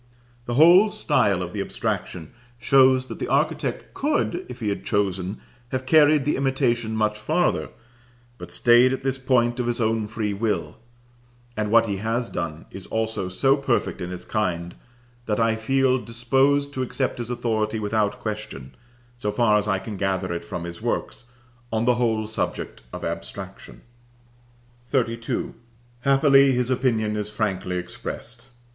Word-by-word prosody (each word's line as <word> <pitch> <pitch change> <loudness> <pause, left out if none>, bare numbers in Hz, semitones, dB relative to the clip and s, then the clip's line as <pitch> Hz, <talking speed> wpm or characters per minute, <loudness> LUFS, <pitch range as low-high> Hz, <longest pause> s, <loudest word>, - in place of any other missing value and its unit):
The 120 - -2
whole 175 - +7
style 100 - +1
of 90 - -7
the 100 - -2
abstraction 85 -4 -4 0.2
shows 130 0 +4
that - - -8
the - - -3
architect - - -1
could, 230 - -1
if 125 0 -8
he 110 -4 -1
had 100 - -3
chosen, 95 -1 -1 0.3
have 130 0 -3
carried 150 0 +5
the 150 - +1
imitation 125 -4 0
much 105 -1 0
farther, 105 - 0 0.7
but - - -8
stayed 120 +2 +5
at 130 - -4
this 135 0 -1
point 125 -2 +2
of 120 - -1
his 120 0 -1
own 110 -1 0
free 105 -1 -2
will; 105 +2 -2 0.8
and 105 -1 -1
what 115 +1 +5
he 100 -3 -2
has 115 +4 -2
done 80 -2 -4
is 95 -1 -9
also 110 -4 -2
so 135 +9 +3
perfect 135 -7 -1
in 90 0 -4
its 90 - -6
kind, 90 -5 -2 0.5
that 105 0 0
I 115 -1 +3
feel 130 +3 +2
disposed 135 +5 +1
to 130 - -3
accept 130 0 -2
his 120 -1 -4
authority 110 -3 -1
without 105 -1 0
question, 105 - -6 0.4
so 105 -3 -2
far 105 -1 +3
as 105 - -3
I 95 -2 +2
can 100 +2 -7
gather 95 -2 -1
it 85 - -4
from 85 - -5
his 85 0 -7
works, - - -3 0.5
on 110 +1 0
the 125 - +4
whole 110 -2 +1
subject 110 - -3
of - - -6
abstraction. - - -7 1.1
XXXII. 115 -4 -1 0.5
Happily 135 0 +5
his 125 0 0
opinion 115 -5 +1
is 105 0 -3
frankly 95 -4 -2
expressed. 120 +7 -6
115 Hz, 160 wpm, -24 LUFS, 105-130 Hz, 1.1 s, whole